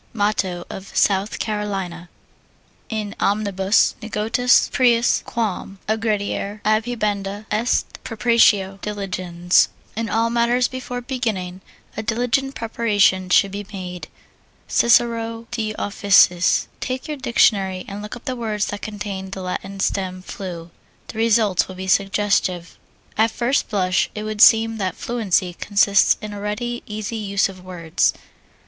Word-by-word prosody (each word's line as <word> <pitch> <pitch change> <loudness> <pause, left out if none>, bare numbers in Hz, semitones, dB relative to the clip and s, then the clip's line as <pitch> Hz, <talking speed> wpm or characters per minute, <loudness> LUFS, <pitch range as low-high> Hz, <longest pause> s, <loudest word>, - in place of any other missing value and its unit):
Motto 205 -5 -1
of 195 +1 -8
South 200 +1 +2
Carolina. 195 -5 -4 0.8
In 215 -2 -3
omnibus 200 -1 +2
negotiis 225 +3 +2
prius 240 -2 +3
quam 210 -4 -3
aggrediare, 210 -1 -1
adhibenda 210 -2 -1
est 220 +3 0
præparatio 210 -4 +3
diligens 185 -4 +1 0.3
In 225 0 -2
all 230 +2 +1
matters 240 +1 +2
before 250 -1 -6
beginning 220 -8 -3 0.3
a - - -3
diligent 245 +5 0
preparation 205 -5 +1
should 195 +2 +4
be 200 0 -6
made. 180 -3 -7 0.6
CICERO, 230 -1 +2
De 215 -3 -3
Officiis. 195 -3 +3
Take 255 0 -4
your 300 -1 -4
dictionary 195 -7 +2
and 200 +1 -6
look 210 +3 -7
up 240 - -13
the 260 - -2
words 215 -4 -2
that 205 -1 -5
contain 200 -2 -5
the 190 -1 -6
Latin 195 +2 -5
stem 185 -1 -2
flu 175 -4 -7 0.4
the 220 - -6
results 220 -4 +3
will 185 - -9
be 190 +1 -6
suggestive. 195 -2 +1 0.4
At 225 +1 +5
first 240 +5 0
blush 185 -3 +1
it 210 - -4
would 215 -1 -3
seem 225 -1 +6
that 190 -4 -2
fluency 200 -6 0
consists 200 +2 +3
in 210 -1 -5
a 200 - -7
ready, 240 +4 -3
easy 215 +1 -4
use 200 -2 +1
of 185 -2 -12
words. 170 -3 0
210 Hz, 130 wpm, -21 LUFS, 190-230 Hz, 0.8 s, seem